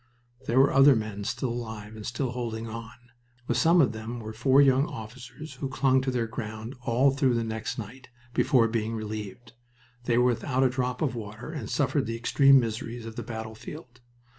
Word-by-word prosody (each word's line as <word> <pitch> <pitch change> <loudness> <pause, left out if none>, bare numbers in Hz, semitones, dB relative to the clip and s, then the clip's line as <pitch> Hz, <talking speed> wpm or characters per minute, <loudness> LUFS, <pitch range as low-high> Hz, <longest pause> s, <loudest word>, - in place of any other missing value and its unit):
There 120 +3 +3
were 135 - +5
other 135 0 +7
men 105 -2 -4
still 125 +3 -2
alive 110 -3 -6
and 110 - -8
still 120 +1 -2
holding 115 -2 -4
on. 115 0 -8 0.5
With 120 -1 0
some 165 +7 +5
of 125 -7 +3
them 110 +2 -6
were 110 -1 -7
four 130 +5 +3
young 135 0 +5
officers, 125 +7 -9
who 135 - -2
clung 130 -1 +2
to 130 - -2
their 125 -2 0
ground 110 +1 -6
all 130 +2 +3
through 135 -2 +2
the 115 - 0
next 110 0 -4
night, 130 +4 -8 0.2
before 120 -2 +4
being 115 0 -2
relieved. 110 +1 -6 0.5
They 120 -1 +2
were 125 - +4
without 125 +2 +1
a 130 - +4
drop 125 +1 -2
of 140 - 0
water 110 +4 -7
and 145 -10 -6
suffered 140 -3 0
the 115 0 -3
extreme 135 +3 +5
miseries 115 0 -4
of 115 -1 -8
the - - -4
battlefield. 120 +4 -8
120 Hz, 190 wpm, -27 LUFS, 110-130 Hz, 0.5 s, other